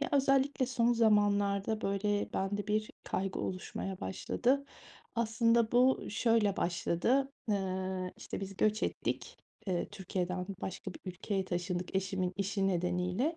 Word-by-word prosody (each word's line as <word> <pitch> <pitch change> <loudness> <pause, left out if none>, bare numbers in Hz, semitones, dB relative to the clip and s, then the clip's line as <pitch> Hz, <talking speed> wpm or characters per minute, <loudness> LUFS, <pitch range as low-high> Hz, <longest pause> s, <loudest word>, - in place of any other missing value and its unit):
Ya, 285 - 0
özellikle 275 -1 +3
son 240 -2 +2
zamanlarda, 205 -2 +3
böyle, 205 +1 0
bende 200 +1 -1
bir 215 0 0
kaygı 190 0 -2
oluşmaya 185 0 -4
başladı. 260 +8 0 0.5
Aslında 230 0 +3
bu 255 +2 +4
şöyle 210 -2 +2
başladı. 205 +10 +1 0.2
Eee, 190 -2 -1
işte, - - -6
biz 195 0 -6
göç 215 +1 +2
ettik. - - -2 0.3
Eee, 180 -3 -1
Türkiye'den 185 -2 -3
başka 190 0 -5
bir - - -11
ülkeye 190 +1 -2
taşındık 180 0 -2
eşimin 190 -1 -1
işi 195 0 0
nedeniyle. 180 - 0
200 Hz, 125 wpm, -33 LUFS, 185-230 Hz, 0.5 s, bu